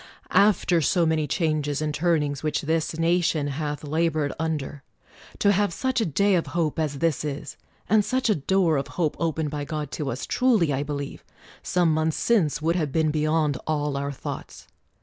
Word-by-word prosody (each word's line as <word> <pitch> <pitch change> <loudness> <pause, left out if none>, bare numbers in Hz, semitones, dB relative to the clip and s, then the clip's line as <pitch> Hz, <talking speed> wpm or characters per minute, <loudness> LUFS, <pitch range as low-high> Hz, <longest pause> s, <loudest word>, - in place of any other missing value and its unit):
After 185 -4 +4
so 170 +3 +2
many 160 -2 +1
changes 150 -4 0
and 155 -1 -2
turnings 150 -3 0
which 155 -1 -1
this 160 +1 -1
nation 165 -3 +1
hath 145 +1 -4
labored 155 -1 0
under, 155 -3 -3 0.6
to 200 - +3
have 205 -1 +2
such 260 +6 -1
a 220 - +1
day 200 +6 +2
of 175 -3 +1
hope 160 -2 0
as 150 -3 -1
this 165 0 0
is, 145 -2 -5 0.3
and 215 0 +4
such 260 +4 0
a 215 - +4
door 170 0 +2
of 135 0 -2
hope 160 -4 +1
opened 160 -3 -1
by 145 -1 -3
God 150 -2 -4
to 150 -4 -3
us, 125 +1 -4
truly 220 - +2
I 135 - -1
believe, 145 -1 -5 0.4
some 175 -3 +2
months 155 0 0
since, 160 - +1
would 165 +2 +2
have 155 -5 -1
been 155 +1 +2
beyond 155 -2 +1
all 150 -2 -1
our 140 +1 -2
thoughts 135 - -8
155 Hz, 185 wpm, -25 LUFS, 145-170 Hz, 0.6 s, After